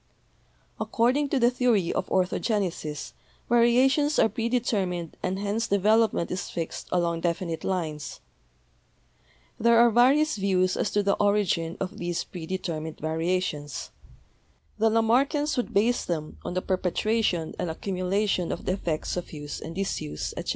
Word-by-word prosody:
According 260 +5 +1
to 280 - +1
the 240 -1 +4
theory 240 -8 +2
of 185 - -2
orthogenesis 185 -5 -1 0.3
variations 260 +5 +4
are - - +5
predetermined 210 -8 -1
and 185 +1 -1
hence 205 +3 -1
development 210 -1 +2
is 180 - -3
fixed 165 -1 -5
along 170 -2 0
defi 175 +2 -1
nite 165 -1 -4
lines. 160 -6 -3 1.4
There 235 +1 +5
are 235 0 +6
various 265 +5 +4
views 185 -2 +1
as - - 0
to 205 - +2
the 200 0 +2
origin 200 -5 +1
of 190 +1 -4
these 175 -1 -2
predetermined 160 -3 -5
variations. 160 -2 -2 0.9
The 225 +1 +4
Lamarckians 260 +7 +2
would 245 - -2
base 230 +5 +2
them 155 -3 -4
on 175 - -4
the 185 - -1
perpetuation 185 -1 0
and 175 - -1
accumulation 185 +2 -1
of - - -5
the - - +1
effects 170 -5 -2
of 175 - -5
use 145 -1 -6
and 165 - -7
disuse, 130 - -3
etc. - - -5
190 Hz, 140 wpm, -26 LUFS, 170-230 Hz, 1.4 s, are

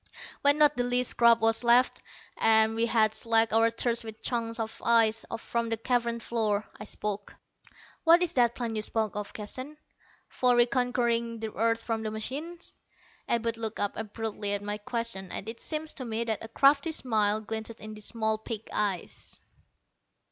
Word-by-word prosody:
When 285 +1 +5
not 295 -3 +4
the 245 - +1
least 245 0 +1
scrap 235 -1 +5
was 225 +1 +3
left, 240 +2 +4 0.3
and 220 0 +4
we 230 +1 +1
had 220 -2 +3
slaked 225 0 +1
our 225 +1 +4
thirst 235 +1 -1
with 220 -1 -10
chunks 230 -1 -2
of 220 0 -5
ice 225 -1 +3
from 230 +1 -2
the 225 - -1
cavern 235 0 0
floor, 215 -3 -1
I 210 - -7
spoke. 205 -1 -4 0.7
"What 335 +2 +6
is 345 -1 +1
that 240 -2 +3
plan 235 -2 -3
you 215 - -1
spoke 215 -1 -1
of, 210 -1 -4
Keston, 255 +8 -7 0.5
for 250 -1 +2
reconquering 240 -2 +1
the 220 -1 -5
earth 230 +1 0
from 225 -1 -2
the 220 - -3
machines?" 290 +11 -6 0.6
Abud 230 -1 0
looked 225 -1 -5
up 205 - 0
abruptly 215 -1 -3
at 205 0 -2
my 205 0 -3
question, 210 -4 -3
and 200 - -5
it 225 +1 -6
seemed 310 0 -2
to 270 - -3
me 230 -1 -2
that 225 -2 -3
a - - -6
crafty 280 +7 +3
smile 215 -7 +1
glinted 220 +1 -5
in 215 0 -8
the 215 - -10
small 220 0 -1
pig 220 -1 -6
eyes. 200 -5 -3
230 Hz, 175 wpm, -28 LUFS, 220-240 Hz, 0.7 s, What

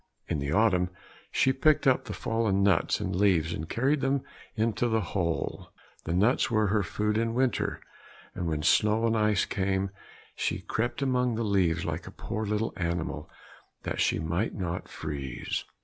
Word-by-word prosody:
In - - -1
the 70 0 -2
autumn 90 -2 +3 0.4
she 130 - +3
picked 150 +3 +3
up 130 -2 +3
the - - -5
fallen 110 -4 0
nuts 100 -1 +3
and 90 0 -2
leaves, 90 -4 +3
and 80 0 -5
carried 135 +5 +1
them 135 0 +1 0.3
into 110 +1 +1
the 110 -1 +1
hole. 85 -4 -2 0.4
The 85 - -1
nuts 105 +8 +3
were 110 -3 +2
her 105 +1 +2
food 105 +3 -1
in 115 0 -1
winter, 130 -2 0 0.5
and 90 - -3
when 75 -2 -1
snow 110 +5 +3
and 115 0 +2
ice 105 -3 +2
came, 95 0 -1 0.4
she - - -1
crept 120 +4 -2
amongst 125 -3 +1
the 115 - 0
leaves 90 -6 +1
like - - -4
a - - -7
poor 110 +1 -4
little 105 +2 -1
animal 85 -3 -2 0.5
that - - -2
she - - +2
might 85 +7 -1
not 90 -3 -3
freeze. 70 -4 -4
105 Hz, 170 wpm, -28 LUFS, 85-115 Hz, 0.5 s, autumn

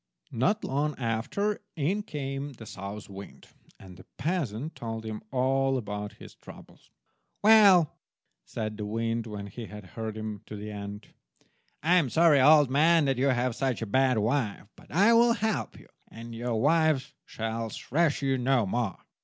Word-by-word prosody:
Not 200 - +1
long 145 +3 -1
after 125 - -1
in 175 +7 0
came 140 -6 -5
the 115 -2 -12
South 100 +1 -7
wind, 100 0 -11 0.3
and 95 -2 -13
the 95 - -14
peasant 150 - -2
told 115 -1 -6
him 110 -1 -5
all 135 +1 +1
about 105 -3 -5
his - - -13
trouble. - - -14 0.6
"Well," 200 -7 +6 0.4
said 110 -1 -5
the 105 - -4
wind, 115 +1 -2
when 105 -2 -6
he 110 +3 -8
had 105 -2 -10
heard 110 -1 -5
him 110 -2 -5
to 105 - -7
an 105 +1 -7
end, 100 0 -7 0.8
"I 175 +3 +4
am 155 -8 +2
sorry, 160 -1 +5
old 150 -1 +6
man, 160 +3 +4
that 135 -2 0
you 135 - +2
have 125 -2 +1
such 130 -4 -1
a - - -2
bad 130 +3 +2
wife, 110 0 0
but - - -19
I 200 +8 +5
will 235 0 +5
help 220 -2 -2
you, - - -18 0.2
and 115 +1 -10
your 115 -1 -2
wife 150 -1 +2
shall 115 0 -4
thrash 150 +5 0
you 135 -1 +1
no 125 -2 +2
more. 110 0 -2
125 Hz, 170 wpm, -28 LUFS, 110-150 Hz, 0.8 s, Well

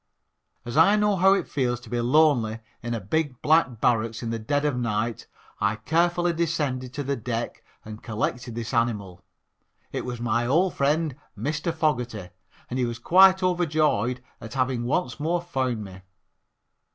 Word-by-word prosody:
As 120 +4 -4
I 170 +6 +6
know 210 -1 +2
how 190 +1 +5
it - - -2
feels 125 -4 -1
to - - -13
be 120 -1 0
lonely 125 -4 +3 0.2
in 120 -1 -3
a - - -2
big 130 - -2
black 150 -7 +3
barracks 115 -1 +1
in 115 - -3
the 115 - -2
dead 145 +7 0
of 145 -3 +1
night 115 -2 -2 0.3
I 100 0 +1
carefully 170 +8 +1
descended 145 -6 -1
to 145 - -2
the 140 +1 -1
deck 120 -1 -4 0.2
and 110 0 -9
collected 120 +2 -3
this 115 +2 -5
animal 105 -7 -1 0.7
it - - -3
was 125 -1 -5
my 120 0 0
old 175 +7 +2
friend, 150 +1 +1 0.2
Mr. 155 +4 -2
Fogerty, 125 - -2 0.4
and 130 - -3
he 125 - +2
was 120 -1 -4
quite 185 +8 +6
overjoyed 155 - +1 0.2
at 110 +2 -8
having 130 -2 0
once 155 +6 -1
more 165 +4 0
found 130 -10 -2
me. 95 -1 -11
125 Hz, 165 wpm, -25 LUFS, 115-160 Hz, 0.7 s, I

